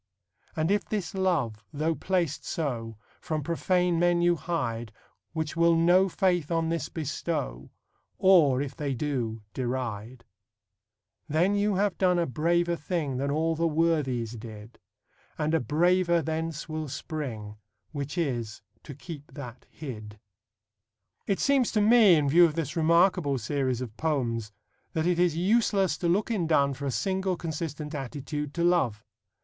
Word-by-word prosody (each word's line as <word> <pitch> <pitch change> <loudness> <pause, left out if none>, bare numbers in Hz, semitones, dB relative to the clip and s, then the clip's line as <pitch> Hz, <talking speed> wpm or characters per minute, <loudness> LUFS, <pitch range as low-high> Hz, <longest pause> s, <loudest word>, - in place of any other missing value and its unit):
And 160 +3 0
if 205 -1 +2
this 200 -7 -3
love, 155 - 0
though 155 +3 0
placed 170 0 -1
so, 115 -8 -3 0.2
From 155 -2 -3
profane 175 +2 +1
men 175 0 +3
you 175 0 +4
hide, 120 - -3 0.4
Which 160 -1 -3
will 170 0 +4
no 175 +3 +4
faith 175 -4 +1
on 165 -1 0
this 165 0 -2
bestow, 65 - -4 0.5
Or, 150 -9 +5
if 140 - -7
they 140 -3 -2
do, 120 -5 -3
deride: 120 -2 -4 1.1
Then 170 +7 +2
you 205 0 +1
have 200 -1 0
done 180 -2 +3
a 170 - +2
braver 170 +5 +1
thing 150 -5 -2
Than 140 +2 -1
all 160 +3 +1
the 165 +1 +1
Worthies 150 -8 0
did; 110 0 -11 0.6
And 155 0 -1
a 165 - +4
braver 170 - +2
thence 160 0 -3
will 155 -1 -4
spring, 130 -7 -5 0.3
Which 145 +2 -5
is, 120 -11 -2 0.2
to 140 - -10
keep 145 0 -10
that 125 -4 -9
hid. 110 -8 -8 1.1
It 195 - 0
seems 275 -4 +2
to 215 - +2
me, 215 -3 +6
in 150 -2 +2
view 170 +5 +7
of 155 -3 -1
this 165 +1 -3
remarkable 170 -3 +3
series 130 +1 -1
of 115 -4 -6
poems, 120 -8 -1 0.4
that 160 0 0
it 175 -1 +1
is 175 -3 +2
useless 195 0 +2
to 175 - 0
look 200 +6 +1
in 185 -7 0
Donne 140 -3 +3
for 140 +2 -5
a - - 0
single 190 +5 -1
consistent 155 -2 -5
attitude 145 +1 -5
to 170 - 0
love. 135 -12 +2
155 Hz, 155 wpm, -27 LUFS, 130-175 Hz, 1.1 s, view